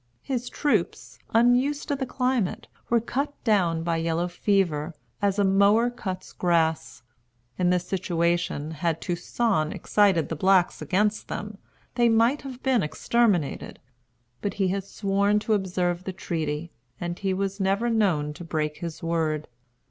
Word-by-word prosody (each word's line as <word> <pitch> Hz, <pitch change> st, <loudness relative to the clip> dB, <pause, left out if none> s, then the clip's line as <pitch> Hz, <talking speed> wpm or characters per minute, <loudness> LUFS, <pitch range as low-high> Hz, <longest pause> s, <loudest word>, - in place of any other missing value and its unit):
His 250 Hz, -2 st, -3 dB
troops, 295 Hz, -, -1 dB
unused 245 Hz, +5 st, +3 dB
to 285 Hz, -, +1 dB
the 265 Hz, -1 st, -3 dB
climate, 250 Hz, -6 st, -1 dB, 0.2 s
were 235 Hz, -, +4 dB
cut 275 Hz, +5 st, -3 dB
down 180 Hz, -8 st, +2 dB
by 165 Hz, -1 st, 0 dB
yellow 165 Hz, +1 st, 0 dB
fever, 175 Hz, -4 st, 0 dB, 0.3 s
as 200 Hz, -1 st, +1 dB
a 205 Hz, -, +3 dB
mower 200 Hz, +5 st, +4 dB
cuts 190 Hz, -6 st, -6 dB
grass. 160 Hz, -9 st, 0 dB, 0.6 s
In 180 Hz, -1 st, +3 dB
this 180 Hz, -1 st, +1 dB
situation, 170 Hz, -4 st, -1 dB
had 165 Hz, +1 st, -1 dB
Toussaint 175 Hz, -1 st, 0 dB
excited 195 Hz, -7 st, +2 dB
the 160 Hz, -, -3 dB
blacks 185 Hz, +2 st, +3 dB
against 210 Hz, +3 st, 0 dB
them, 210 Hz, -1 st, -6 dB, 0.3 s
they 240 Hz, -1 st, +3 dB
might 230 Hz, +5 st, +3 dB
have 260 Hz, -2 st, -9 dB
been 260 Hz, -4 st, +3 dB
exterminated; 190 Hz, 0 st, 0 dB, 0.6 s
but 200 Hz, -1 st, -2 dB
he 195 Hz, -2 st, +1 dB
had 195 Hz, +1 st, -2 dB
sworn 200 Hz, +1 st, +1 dB
to 215 Hz, +1 st, 0 dB
observe 180 Hz, -3 st, 0 dB
the 190 Hz, -, -5 dB
treaty, 160 Hz, -3 st, -3 dB, 0.3 s
and 175 Hz, 0 st, -4 dB
he 195 Hz, -1 st, -1 dB
was 195 Hz, +1 st, -2 dB
never 195 Hz, +4 st, +1 dB
known 185 Hz, -10 st, +1 dB
to 175 Hz, -, -9 dB
break 155 Hz, -2 st, -2 dB
his 170 Hz, -2 st, -7 dB
word. 160 Hz, -2 st, -1 dB
190 Hz, 150 wpm, -26 LUFS, 170-220 Hz, 0.6 s, were